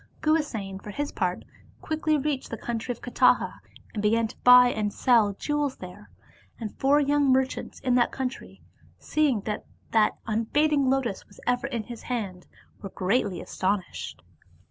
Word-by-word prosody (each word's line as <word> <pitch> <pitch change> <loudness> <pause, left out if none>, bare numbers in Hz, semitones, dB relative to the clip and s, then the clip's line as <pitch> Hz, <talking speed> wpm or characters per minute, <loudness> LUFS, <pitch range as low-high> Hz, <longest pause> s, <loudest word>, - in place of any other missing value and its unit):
Guhasena 225 -12 -1
for - - -9
his 290 +8 -3
part 180 -2 -2 0.3
quickly 310 -1 0
reached 285 -2 -2
the 230 - -5
coun 235 0 -3
try 235 - -4
of 240 - -7
Kataha, 245 - +2 0.3
and 210 - -3
began 225 +2 +2
to - - -13
buy 250 0 +8
and 210 -3 -1
sell 225 -5 +3
jewels 290 +4 -1
there. 185 +3 -11 0.5
And 220 -3 -5
four 280 +2 +4
young 285 -1 +3
merchants 260 0 0
in 255 - +1
that 245 -1 +3
country, 260 -1 -5 0.3
seeing 290 -8 +1
that 210 +1 -4 0.2
that 220 -2 +3
un 225 0 -1
fading 295 -2 +2
lotus 260 -7 -1
was 200 - -18
ever 245 +2 +1
in 235 -5 -3
his 235 0 -9
hand, 200 -8 -4 0.3
were 195 - -6
greatly 195 0 0
astonished. 190 -1 -3
240 Hz, 165 wpm, -26 LUFS, 210-275 Hz, 0.5 s, buy